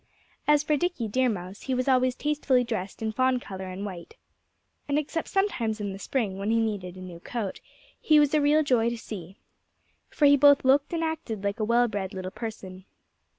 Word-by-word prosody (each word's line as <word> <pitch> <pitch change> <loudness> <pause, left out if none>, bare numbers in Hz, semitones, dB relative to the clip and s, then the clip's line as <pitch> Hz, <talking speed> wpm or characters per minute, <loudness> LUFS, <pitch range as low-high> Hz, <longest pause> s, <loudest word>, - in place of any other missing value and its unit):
As 295 0 +4
for 300 0 +1
Dickie 345 -9 -1
Deer 255 +4 +1
Mouse, 190 -2 -5
he 260 - -2
was 255 +1 -1
always 255 -1 +3
tastefully 290 -4 +1
dressed 220 -3 -4
in 220 - -1
fawn 255 +3 +2
color 190 -5 -7
and 185 +2 -6
white. 190 - -8 0.7
And 285 0 +1
except 310 +2 -2
sometimes 245 - 0
in 205 -2 -3
the 195 - -8
spring, 205 -5 -2
when 200 +2 -2
he 230 - +3
needed 200 -5 -2
a - - -9
new 180 -2 -9
coat, 210 +1 -5 0.4
he 310 -1 +5
was 295 -1 +3
a 305 - +4
real 300 +2 +4
joy 240 -5 +2
to 235 - -4
see. 195 -4 -9 0.7
For 295 - +1
he 285 0 +7
both 285 -1 +5
looked 275 +2 +3
and 330 -1 -1
acted 310 -11 -4
like 200 +1 -2
a - - 0
well 235 +2 +3
bred 200 -2 -4
little 185 0 -5
person. 190 -4 -8
235 Hz, 205 wpm, -27 LUFS, 200-285 Hz, 0.7 s, he